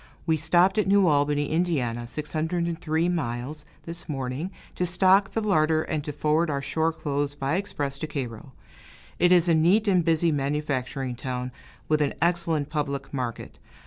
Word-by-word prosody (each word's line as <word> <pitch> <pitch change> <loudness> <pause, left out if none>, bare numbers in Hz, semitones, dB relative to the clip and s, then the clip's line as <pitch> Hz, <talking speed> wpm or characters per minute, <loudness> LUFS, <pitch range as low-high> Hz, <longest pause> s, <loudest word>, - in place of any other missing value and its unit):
We 160 -1 +3
stopped 175 +6 +3
at 210 - +1
New 200 0 +5
Albany, 145 -2 +2
Ind. 130 -9 -1
(603 160 +2 -1
miles), 145 -2 -3 0.2
this 170 0 -7
morning, 135 +4 -3 0.2
to 180 - -1
stock 190 +2 +4
the 225 - 0
larder 160 -6 +2
and 150 -2 -3
to 150 - -4
forward 155 +3 +1
our 140 -2 -1
shore 160 +4 0
clothes 145 -2 -2
by 140 0 -2
express 145 -8 -3
to 155 - -3
Cairo. 130 -3 -6 0.7
It 175 - +4
is 175 -1 +5
a 170 - +4
neat 180 +7 +3
and 185 -3 +4
busy 165 0 +2
manufacturing 135 -3 -2
town, 125 0 -4 0.4
with 155 -1 +2
an 145 - 0
excellent 165 -3 0
public 140 -3 -3
market. 125 -4 -5
155 Hz, 160 wpm, -26 LUFS, 140-170 Hz, 0.7 s, New